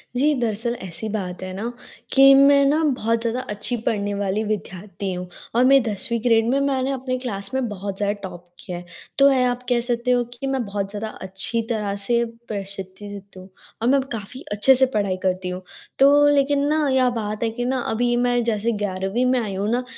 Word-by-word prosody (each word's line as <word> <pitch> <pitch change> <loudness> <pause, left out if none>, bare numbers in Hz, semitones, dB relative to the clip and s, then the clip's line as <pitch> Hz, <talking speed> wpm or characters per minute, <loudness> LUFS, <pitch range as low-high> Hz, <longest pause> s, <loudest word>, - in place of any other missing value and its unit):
जी, 295 +4 +3
दरअसल 235 +1 -1
ऐसी 185 +4 -5
बात 185 -4 -4
है 185 0 -5
ना 225 +5 -3 0.4
कि 275 0 +8
मैं 280 +1 +6
ना 305 +3 +2
बहुत 230 +1 0
ज़्यादा 235 +2 -1
अच्छी 210 +4 -2
पढ़ने 205 -2 0
वाली 200 +2 -1
विद्यार्थी 200 -1 -4
हूँ 180 0 -5 0.3
और 245 - +5
मैं 270 0 +6
10वीं 225 +1 -2
ग्रेड 225 -2 +3
में 275 +2 +2
मैंने 270 -1 0
अपने 255 -1 -2
क्लास 200 -6 -4
में 265 -2 0
बहुत 200 -1 -5
ज़्यादा 205 0 +1
टॉप 175 -1 -9
किया 180 - -6
है। 175 - -9 0.3
तो 280 0 +7
यह 255 -2 +3
आप 245 +1 -5
कह 245 -1 +3
सकते 240 +1 0
हो 245 -1 +3
कि 245 +3 -5
मैं 270 -2 0
बहुत 200 -1 -3
ज़्यादा 210 +2 -4
अच्छी 195 +5 -1
तरह 210 -3 -1
से 235 +2 +2 0.2
प्रसिद्धित 200 0 -7
हूँ 185 +1 -11 0.3
और 235 - +1
मैं 275 0 +4
काफ़ी 225 +3 -6
अच्छे 210 +6 +5
से 265 +1 +5
पढ़ाई 200 -3 0
करती 185 0 -1
हूँ, 180 +1 -5 0.4
तो 285 +2 +6
लेकिन 280 0 +2
ना 305 -1 +1
यह 260 -1 +3
बात 215 0 -3
है 225 - +1
कि 245 +1 -4
ना 260 0 0
अभी 240 +1 +1
मैं 245 0 +2
जैसे 230 0 0
11वीं 195 +5 -1
में 255 0 +3
आई 210 -5 -3
हूँ 200 +2 -1
ना, 245 +2 0
225 Hz, 205 wpm, -22 LUFS, 200-255 Hz, 0.4 s, कि